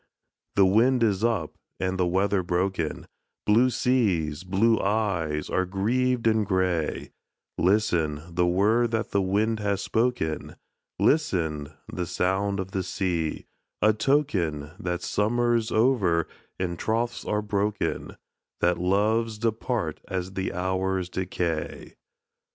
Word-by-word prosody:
The 100 - +6
wind 115 +6 +4
is 105 -2 +1
up, 110 -10 0 0.3
and 95 0 -1
the 90 - +2
weather 95 +2 +1
broken, 90 -2 -1 0.4
Blue 115 +5 +5
seas, 95 - +1
blue 105 +5 +2
eyes, 95 -8 0
are 95 - +1
grieved 120 +6 0
and 110 -1 +3
grey, 95 -5 -1 0.4
Listen, 85 -6 +1
the 90 0 +1
word 105 +7 +3
that 110 -1 -2
the 100 - +2
wind 105 +4 +1
has 100 -2 -1
spoken, 110 -10 -1 0.4
Listen, 80 - +1 0.2
the 90 -1 -4
sound 95 +4 0
of 95 0 -4
the 95 - -1
sea,—a 90 +4 -2
token 95 - 0
That 90 -3 -3
summer's 120 +3 +1
over, 105 -9 +2 0.3
and 85 -2 -3
troths 115 +2 -1
are 105 0 -1
broken,— 105 0 -2 0.4
That 85 0 +2
loves 105 +5 +1
depart 110 -5 -2
as 95 0 -3
the 95 0 -2
hours 95 0 -1
decay. 90 -3 -3
95 Hz, 120 wpm, -26 LUFS, 90-110 Hz, 0.4 s, The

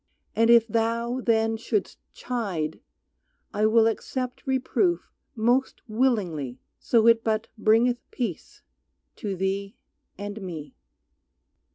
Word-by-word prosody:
And 230 +1 +3
if 235 -1 +7
thou 230 +3 0
then 225 -1 +2
shouldst 220 -3 -2
chide 195 -11 -3 0.7
I 210 +1 +3
will 225 0 +5
accept 250 +4 -3
reproof 265 +7 0 0.2
most 245 +4 +1
willingly 200 - 0 0.2
So 230 -2 +3
it 230 -1 +5
but 220 0 -1
bringeth 230 +3 +3
peace 225 - -5 0.5
to 205 -5 -3
thee 195 +3 -2 0.4
and 205 +2 -6
me. 160 -7 -7
225 Hz, 105 wpm, -26 LUFS, 200-235 Hz, 0.7 s, if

